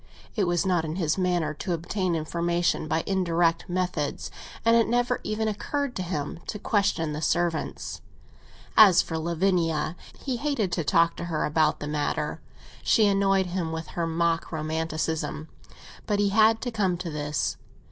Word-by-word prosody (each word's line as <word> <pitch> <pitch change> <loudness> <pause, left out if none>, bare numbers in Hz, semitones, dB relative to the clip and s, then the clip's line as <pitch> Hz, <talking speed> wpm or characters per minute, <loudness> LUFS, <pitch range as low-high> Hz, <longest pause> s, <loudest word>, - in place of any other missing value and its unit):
It 205 - +2
was 175 0 +1
not 180 -3 +2
in 155 0 -4
his 165 -4 +1
manner 175 -4 +1
to 175 +4 -3
obtain 175 +2 -1
information 170 +1 0
by 160 +1 0
indirect 170 -3 +1
methods, 175 -5 -2 0.3
and 230 0 +6
it 230 -1 +4
never 245 +1 +1
even 215 +1 -1
occurred 275 +5 -2
to - - -2
him 170 -3 -3
to - - -3
question 200 -7 0
the 150 - -4
servants. 170 0 -1 0.7
As 195 -5 +8
for 160 -1 -4
Lavinia, 170 -1 0 0.2
he 260 -3 -2
hated 255 -8 -1
to 170 - -1
talk 165 +3 +3
to 175 - -4
her 165 -3 -1
about 155 +1 +2
the 145 - -5
matter; 150 0 -2 0.4
she 220 - +4
annoyed 195 -1 +3
him 175 -2 -3
with 160 -1 -5
her 170 -1 -2
mock 165 0 0
romanticism. 160 0 -2 0.6
But 205 - +1
he 205 0 +2
had 220 +2 +4
to 245 - -3
come 195 -5 0
to 175 -1 -5
this. 150 0 -2
175 Hz, 165 wpm, -26 LUFS, 160-195 Hz, 0.7 s, As